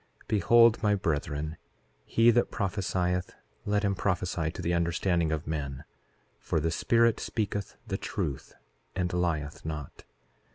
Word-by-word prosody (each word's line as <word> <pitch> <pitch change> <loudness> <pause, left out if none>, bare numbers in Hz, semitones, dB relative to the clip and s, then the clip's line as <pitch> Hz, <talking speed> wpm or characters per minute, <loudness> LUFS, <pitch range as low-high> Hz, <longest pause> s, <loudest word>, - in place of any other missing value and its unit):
4:13 - - -37
Behold, 115 +3 +5
my 105 -2 +3
brethren, 75 -3 -2 0.5
he 115 +1 +5
that 120 +1 +2
prophesieth, 90 -3 -1 0.3
let 105 +1 +1
him 100 -1 +2
prophesy 90 -4 -1
to - - -9
the 85 - 0
understanding 85 -1 +1
of 80 -1 -2
men; 70 -4 -4 0.6
for - - -1
the 80 +2 0
Spirit 115 +6 +3
speaketh 105 -2 -3
the - - -3
truth 70 -3 -4 0.4
and 90 -1 -1
lieth 80 -4 -1
not. 75 -3 -6
90 Hz, 135 wpm, -29 LUFS, 80-100 Hz, 0.6 s, Behold